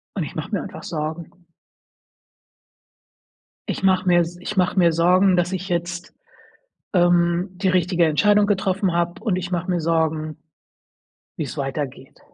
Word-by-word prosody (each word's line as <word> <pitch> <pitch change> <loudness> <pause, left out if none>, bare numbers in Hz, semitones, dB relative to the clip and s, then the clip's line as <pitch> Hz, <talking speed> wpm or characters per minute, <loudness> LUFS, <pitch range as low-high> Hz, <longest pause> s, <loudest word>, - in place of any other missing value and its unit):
und - - -1
ich - - -8
mache - - -5
mir - - -1
einfach - - -9
Sorgen. 160 +1 -5 2.4
Ich - - -3
mache 185 -1 +3
mir 175 -1 +5
s 170 +1 -1
ich 205 +2 -5
mach 180 +1 +2
mir 170 -3 +4
Sorgen, 180 +3 +3
dass 175 +2 0
ich 185 +1 -4
jetzt, 175 0 -3 0.8
ähm, 175 +1 +3
die 190 +1 -1
richtige 180 -1 +2
Entscheidung 205 +7 +3
getroffen 195 -2 0
habe, 175 +3 -1
und 205 -6 +1
ich 180 0 -5
mach 175 0 -2
mir 180 -2 0
Sorgen, 160 -1 -1 1.0
wie's 150 -1 -5
weitergeht. 135 -1 -5
175 Hz, 145 wpm, -22 LUFS, 165-185 Hz, 2.4 s, mir